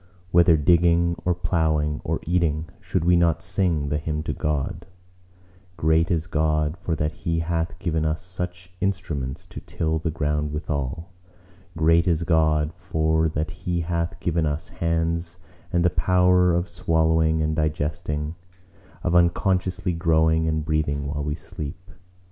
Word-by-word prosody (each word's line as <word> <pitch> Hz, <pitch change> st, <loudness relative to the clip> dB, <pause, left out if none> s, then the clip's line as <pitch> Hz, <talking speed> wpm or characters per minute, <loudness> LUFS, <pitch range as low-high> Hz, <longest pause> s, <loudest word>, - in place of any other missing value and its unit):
Whether 85 Hz, -1 st, +5 dB
digging 85 Hz, +2 st, +3 dB
or 90 Hz, -1 st, +2 dB
ploughing 80 Hz, -4 st, 0 dB
or -, -, -1 dB
eating, 80 Hz, -2 st, 0 dB
should 90 Hz, -3 st, -2 dB
we 90 Hz, 0 st, +5 dB
not 85 Hz, -1 st, +2 dB
sing 85 Hz, -5 st, 0 dB
the 75 Hz, +1 st, 0 dB
hymn 75 Hz, 0 st, -3 dB
to -, -, -2 dB
God:— 75 Hz, +2 st, -2 dB, 0.9 s
Great 80 Hz, +1 st, +2 dB
is 80 Hz, -3 st, 0 dB
God, 75 Hz, -1 st, 0 dB
for 85 Hz, -2 st, -2 dB
that 75 Hz, 0 st, -1 dB
He 85 Hz, -2 st, -2 dB
hath 80 Hz, 0 st, -2 dB
given 80 Hz, -3 st, -1 dB
us 80 Hz, 0 st, 0 dB
such 90 Hz, 0 st, -6 dB
instruments 90 Hz, -5 st, -2 dB
to 90 Hz, -, -9 dB
till 80 Hz, 0 st, -2 dB
the 80 Hz, -, -2 dB
ground 75 Hz, -1 st, -1 dB
withal: 75 Hz, +2 st, -3 dB, 0.7 s
Great 85 Hz, +2 st, +4 dB
is 85 Hz, -1 st, +2 dB
God, 80 Hz, -2 st, +2 dB
for 80 Hz, -2 st, 0 dB
that 80 Hz, +1 st, -2 dB
He 85 Hz, -1 st, -3 dB
hath 85 Hz, +2 st, -2 dB
given 85 Hz, -2 st, 0 dB
us 75 Hz, +4 st, -3 dB
hands 85 Hz, +1 st, -1 dB, 0.3 s
and 85 Hz, -1 st, +2 dB
the 90 Hz, -, +4 dB
power 90 Hz, +1 st, +3 dB
of 85 Hz, +1 st, 0 dB
swallowing 80 Hz, -1 st, +1 dB
and 80 Hz, 0 st, 0 dB
digesting; 75 Hz, 0 st, -2 dB, 0.7 s
of 90 Hz, -, 0 dB
unconsciously 90 Hz, +1 st, +2 dB
growing 80 Hz, -1 st, +2 dB
and 80 Hz, -1 st, -1 dB
breathing 75 Hz, -3 st, 0 dB
while 70 Hz, +1 st, -3 dB
we 75 Hz, 0 st, -2 dB
sleep! 80 Hz, +2 st, -8 dB
80 Hz, 150 wpm, -24 LUFS, 75-85 Hz, 0.9 s, Whether